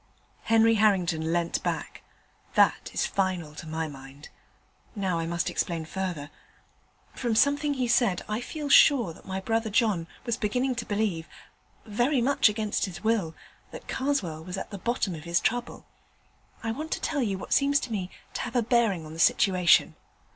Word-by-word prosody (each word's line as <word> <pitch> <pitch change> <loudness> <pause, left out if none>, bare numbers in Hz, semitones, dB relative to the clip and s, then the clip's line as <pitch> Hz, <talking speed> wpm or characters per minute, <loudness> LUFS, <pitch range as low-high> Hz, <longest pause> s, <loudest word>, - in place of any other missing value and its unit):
Henry 225 0 +5
Harrington 175 -6 +2
leant 170 0 0
back. - - -4 0.5
'That - - +3
is - - 0
final 185 -6 -1
to 150 +1 -9
my 160 0 -3
mind. 135 0 -12 0.7
Now 190 -5 -1
I 165 - -2
must 170 +2 -1
explain 165 -2 -2
further. 170 -5 -4 0.8
From 240 -3 -1
something 285 +3 +2
he 255 -2 -1
said, 235 -6 +2
I 215 +2 -2
feel 300 +3 -5
sure 260 - +6
that - - -17
my 190 0 -3
brother 225 +3 -1
John 210 -6 +1 0.2
was 235 -2 -1
beginning 250 +5 0
to 230 - -4
believe 200 -6 -1 0.6
very 240 +6 +1
much 255 -2 +4
against 210 0 -1
his 190 0 -8
will 215 -8 0 0.3
that - - -11
Karswell 200 - -2
was 180 +2 -6
at - - -6
the 200 - -6
bottom 235 -3 -1
of 160 -1 -8
his 170 0 +2
trouble. 245 +1 -2 0.8
I 225 - -1
want 310 +7 -5
to - - -3
tell 290 -3 -1
you 200 -6 -1
what - - -4
seems 280 0 +3
to 250 - -6
me 190 -4 -3 0.2
to - - -3
have 250 0 -5
a 240 - +3
bearing 220 -8 +1
on 155 - -9
the 165 - -9
situation. 180 0 +4
205 Hz, 175 wpm, -27 LUFS, 170-240 Hz, 0.8 s, sure